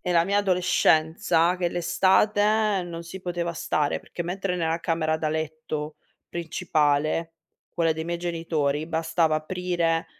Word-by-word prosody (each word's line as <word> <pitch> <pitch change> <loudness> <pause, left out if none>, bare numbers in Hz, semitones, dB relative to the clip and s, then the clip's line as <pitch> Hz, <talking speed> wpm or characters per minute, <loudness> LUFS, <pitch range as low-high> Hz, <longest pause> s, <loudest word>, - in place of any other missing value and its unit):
e 180 - -2
la 170 0 +4
mia 200 +2 +1
adolescenza 175 -2 +2
che 175 -1 0
l'estate 205 +4 +2
non 170 -1 -7
si 170 +3 -9
poteva 175 -1 -3
stare, 150 -2 0
perché 175 - -6
mentre 180 +2 -2
nella 165 -1 0
camera 160 -2 0
da 155 -1 -1
letto 155 -1 -4 0.3
principale, 160 -2 0 0.4
quella 165 -1 +1
dei 160 +1 -5
miei 170 0 -3
genitori, 160 -4 -1
bastava 165 0 +1
aprire 170 0 -1
170 Hz, 135 wpm, -25 LUFS, 160-180 Hz, 0.4 s, la